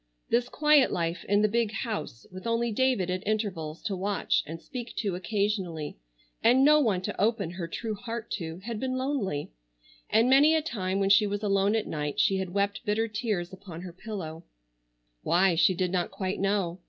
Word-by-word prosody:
This 240 Hz, +1 st, +2 dB
quiet 300 Hz, -3 st, +4 dB
life 170 Hz, 0 st, -2 dB
in 205 Hz, +1 st, +3 dB
the -, -, +5 dB
big 225 Hz, 0 st, 0 dB
house, 215 Hz, -, -4 dB
with 185 Hz, +4 st, -7 dB
only 230 Hz, 0 st, +1 dB
David 220 Hz, -6 st, +1 dB
at 185 Hz, 0 st, -2 dB
intervals 190 Hz, -8 st, -2 dB
to 205 Hz, -3 st, -2 dB
watch 195 Hz, +2 st, 0 dB
and 165 Hz, +2 st, -6 dB
speak 245 Hz, -, -7 dB
to 200 Hz, -4 st, -1 dB
occasionally, 185 Hz, -5 st, -2 dB, 0.5 s
and 245 Hz, +4 st, +5 dB
no 300 Hz, +1 st, +7 dB
one 205 Hz, -10 st, +1 dB
to -, -, -3 dB
open 210 Hz, -5 st, +1 dB
her 175 Hz, -1 st, -5 dB
true 220 Hz, +6 st, -4 dB
heart 230 Hz, +2 st, -6 dB
to, 165 Hz, -3 st, -4 dB
had 230 Hz, -2 st, -4 dB
been 255 Hz, +1 st, -2 dB
lonely; 255 Hz, -, -2 dB, 0.6 s
and 225 Hz, +2 st, +4 dB
many 285 Hz, +5 st, +6 dB
a 320 Hz, -, +2 dB
time 195 Hz, -9 st, -2 dB
when 195 Hz, 0 st, +2 dB
she 205 Hz, +1 st, +6 dB
was 205 Hz, +1 st, -3 dB
alone 200 Hz, +1 st, +2 dB
at 220 Hz, -, 0 dB
night 150 Hz, -2 st, -3 dB
she 195 Hz, -, +3 dB
had 190 Hz, -1 st, -3 dB
wept 200 Hz, +2 st, -1 dB
bitter 220 Hz, +2 st, 0 dB
tears 210 Hz, -5 st, -2 dB
upon 180 Hz, -3 st, -9 dB
her 180 Hz, -1 st, -8 dB
pillow,—why 155 Hz, -, -3 dB
she 170 Hz, +3 st, +4 dB
did 180 Hz, 0 st, -1 dB
not 180 Hz, -2 st, 0 dB
quite 190 Hz, -1 st, -3 dB
know. 195 Hz, -3 st, 0 dB
200 Hz, 190 wpm, -28 LUFS, 175-225 Hz, 0.6 s, no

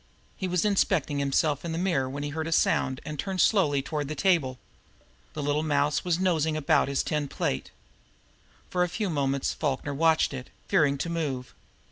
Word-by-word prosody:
He 190 Hz, -, -3 dB
was 180 Hz, +1 st, 0 dB
inspecting 185 Hz, -8 st, +1 dB
himself 140 Hz, +1 st, +1 dB
in 170 Hz, -1 st, -3 dB
the -, -, -2 dB
mirror 170 Hz, -8 st, 0 dB
when 140 Hz, +2 st, -5 dB
he 145 Hz, -, -2 dB
heard 160 Hz, +2 st, -3 dB
a -, -, -4 dB
sound 130 Hz, -4 st, +2 dB
that 150 Hz, -2 st, -6 dB
turned 195 Hz, -1 st, -2 dB
him -, -, -4 dB
slowly 145 Hz, -11 st, +3 dB
toward 150 Hz, -1 st, -3 dB
the 155 Hz, -, -4 dB
table. 150 Hz, -7 st, +2 dB, 0.8 s
The 150 Hz, -, -4 dB
little 145 Hz, +1 st, +1 dB
mouse 150 Hz, -1 st, +1 dB
was 175 Hz, -2 st, +1 dB
nosing 160 Hz, -4 st, +1 dB
about 145 Hz, -3 st, +3 dB
his 140 Hz, -1 st, 0 dB
tin 150 Hz, -2 st, -1 dB
plate. 65 Hz, -, -2 dB, 1.0 s
For 180 Hz, -, 0 dB
a 180 Hz, -, +2 dB
few 205 Hz, +1 st, -2 dB
moments 140 Hz, -2 st, 0 dB
Falkner 145 Hz, -1 st, -2 dB
watched 160 Hz, 0 st, +3 dB
it, 130 Hz, -2 st, -7 dB, 0.2 s
fearing 150 Hz, -8 st, +3 dB
to 170 Hz, -, -3 dB
move. 140 Hz, -7 st, -3 dB
150 Hz, 190 wpm, -27 LUFS, 140-170 Hz, 1.0 s, slowly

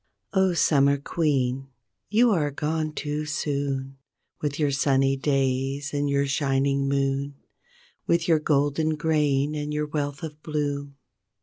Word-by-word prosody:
0, 190 Hz, -2 st, +3 dB
Summer 140 Hz, -3 st, +4 dB
Queen! 135 Hz, -3 st, 0 dB, 0.4 s
you 230 Hz, +3 st, +4 dB
are 155 Hz, -7 st, +1 dB
gone 155 Hz, +2 st, -2 dB
too 150 Hz, 0 st, -3 dB
soon 140 Hz, -3 st, -2 dB, 0.4 s
With 145 Hz, -1 st, -2 dB
your 150 Hz, -2 st, +1 dB
sunny 135 Hz, 0 st, +2 dB
days 135 Hz, +1 st, -1 dB
and 145 Hz, 0 st, 0 dB
your 140 Hz, 0 st, +2 dB
shining 140 Hz, 0 st, +1 dB
moon, 140 Hz, 0 st, 0 dB, 0.7 s
With 170 Hz, +1 st, +2 dB
your 160 Hz, -2 st, +4 dB
golden 150 Hz, +1 st, +1 dB
grain 150 Hz, -2 st, +1 dB
and 150 Hz, 0 st, -3 dB
your 150 Hz, 0 st, -1 dB
wealth 145 Hz, -1 st, -3 dB
of 155 Hz, -1 st, -7 dB
bloom. 145 Hz, -2 st, -3 dB
145 Hz, 130 wpm, -25 LUFS, 140-150 Hz, 0.7 s, Summer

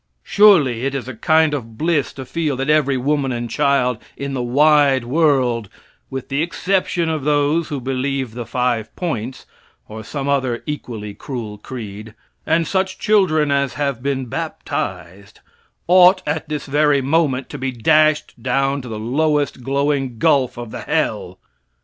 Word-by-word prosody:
Surely 150 Hz, -, +4 dB
it 140 Hz, +1 st, -1 dB
is 130 Hz, -2 st, -4 dB
a 130 Hz, -, -5 dB
kind 155 Hz, +6 st, +2 dB
of 115 Hz, -6 st, -5 dB
bliss 155 Hz, -1 st, 0 dB
to 130 Hz, -, -8 dB
feel 155 Hz, -1 st, -2 dB
that 135 Hz, +3 st, 0 dB
every 140 Hz, -3 st, +2 dB
woman 140 Hz, +1 st, 0 dB
and 120 Hz, -1 st, -4 dB
child 125 Hz, -4 st, +1 dB, 0.2 s
in 140 Hz, 0 st, -4 dB
the 130 Hz, -, -2 dB
wide 140 Hz, +1 st, +4 dB
world, 125 Hz, -, +1 dB, 0.4 s
with 135 Hz, -1 st, -6 dB
the 140 Hz, +2 st, 0 dB
exception 175 Hz, 0 st, 0 dB
of 160 Hz, -3 st, -2 dB
those 150 Hz, +2 st, +1 dB
who 145 Hz, -4 st, -4 dB
believe 130 Hz, -1 st, -2 dB
the 120 Hz, -1 st, -6 dB
five 120 Hz, -3 st, -1 dB
points, 130 Hz, -8 st, -4 dB, 0.4 s
or 110 Hz, +1 st, -8 dB
some 140 Hz, +4 st, -5 dB
other 130 Hz, -4 st, 0 dB
equally 115 Hz, -8 st, -6 dB
cruel 110 Hz, -4 st, -7 dB
creed, 110 Hz, -3 st, -8 dB, 0.3 s
and 165 Hz, +1 st, +2 dB
such 190 Hz, +2 st, -1 dB
children 160 Hz, -8 st, +2 dB
as 140 Hz, -2 st, 0 dB
have 140 Hz, -5 st, -2 dB
been 135 Hz, -1 st, -2 dB
baptized, 100 Hz, -4 st, -5 dB, 0.5 s
ought 185 Hz, +1 st, +6 dB
at 160 Hz, -, -2 dB
this 150 Hz, -1 st, -3 dB
very 145 Hz, -1 st, +2 dB
moment 140 Hz, -2 st, +1 dB
to 145 Hz, -, -8 dB
be 130 Hz, 0 st, -2 dB
dashed 155 Hz, +1 st, +2 dB
down 135 Hz, +3 st, 0 dB
to 125 Hz, -, -10 dB
the 110 Hz, -, -5 dB
lowest 145 Hz, +4 st, 0 dB
glowing 135 Hz, -1 st, -1 dB
gulf 140 Hz, -4 st, +2 dB
of 120 Hz, -2 st, -7 dB
the -, -, -6 dB
hell! -, -, -2 dB
140 Hz, 160 wpm, -19 LUFS, 125-150 Hz, 0.5 s, ought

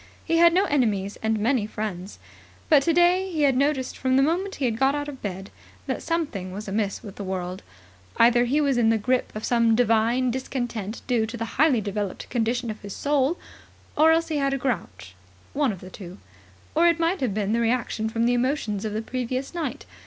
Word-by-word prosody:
He 330 Hz, -, +1 dB
had 340 Hz, 0 st, +7 dB
no 375 Hz, +4 st, +3 dB
enemies 210 Hz, -8 st, 0 dB
and 220 Hz, 0 st, 0 dB
many 225 Hz, 0 st, +1 dB
friends. 205 Hz, -3 st, -5 dB, 0.5 s
But 300 Hz, -4 st, +6 dB
today 350 Hz, +4 st, +3 dB
he 310 Hz, -3 st, 0 dB
had 275 Hz, -2 st, +4 dB
noticed 270 Hz, -1 st, 0 dB
from 260 Hz, 0 st, +1 dB
the 270 Hz, -, +5 dB
moment 365 Hz, +6 st, 0 dB
he 275 Hz, -, -2 dB
had 230 Hz, -2 st, -1 dB
got 270 Hz, +1 st, +3 dB
out 290 Hz, 0 st, -3 dB
of 275 Hz, -3 st, -8 dB
bed 195 Hz, -1 st, -6 dB, 0.3 s
that -, -, -3 dB
something 290 Hz, -, -2 dB
was 205 Hz, +3 st, -7 dB
amiss 200 Hz, 0 st, -2 dB
with 200 Hz, -3 st, -10 dB
the 205 Hz, -, -5 dB
world. 185 Hz, -1 st, -4 dB, 0.6 s
Either 240 Hz, +1 st, +5 dB
he 275 Hz, +5 st, +1 dB
was 280 Hz, -4 st, +2 dB
in 225 Hz, -2 st, +4 dB
the 225 Hz, -, +3 dB
grip 250 Hz, +4 st, 0 dB
of 215 Hz, -, -5 dB
some 230 Hz, -2 st, +3 dB
divine 235 Hz, +2 st, +2 dB
discontent 240 Hz, -4 st, -4 dB
due 235 Hz, -4 st, +1 dB
to 235 Hz, +2 st, -6 dB
the 230 Hz, -, -3 dB, 0.2 s
highly 280 Hz, -8 st, +4 dB
developed 205 Hz, -1 st, -4 dB
condition 240 Hz, 0 st, -1 dB
of 215 Hz, -, -10 dB
his 200 Hz, -1 st, -7 dB
soul, 290 Hz, +3 st, +1 dB, 0.6 s
or 315 Hz, +2 st, +5 dB
else 330 Hz, +1 st, +2 dB
he 310 Hz, -, -1 dB
had 275 Hz, -1 st, +1 dB
a -, -, -1 dB
grouch. 170 Hz, -, -4 dB, 0.4 s
One 285 Hz, -4 st, +1 dB
of 190 Hz, -, -8 dB
the 185 Hz, -, -11 dB
two. 185 Hz, -1 st, -10 dB, 0.6 s
Or 335 Hz, +2 st, +4 dB
it 335 Hz, -1 st, +2 dB
might 335 Hz, +2 st, 0 dB
have 235 Hz, -7 st, -1 dB
been 210 Hz, 0 st, 0 dB
the 230 Hz, -, +1 dB
reaction 230 Hz, -2 st, 0 dB
from 230 Hz, +1 st, 0 dB
the 245 Hz, -, +3 dB
emotions 240 Hz, -5 st, -1 dB
of 215 Hz, -, -3 dB
the 220 Hz, +1 st, -3 dB
previous 255 Hz, +3 st, -3 dB
night. 300 Hz, -5 st, -4 dB
245 Hz, 210 wpm, -25 LUFS, 215-285 Hz, 0.6 s, had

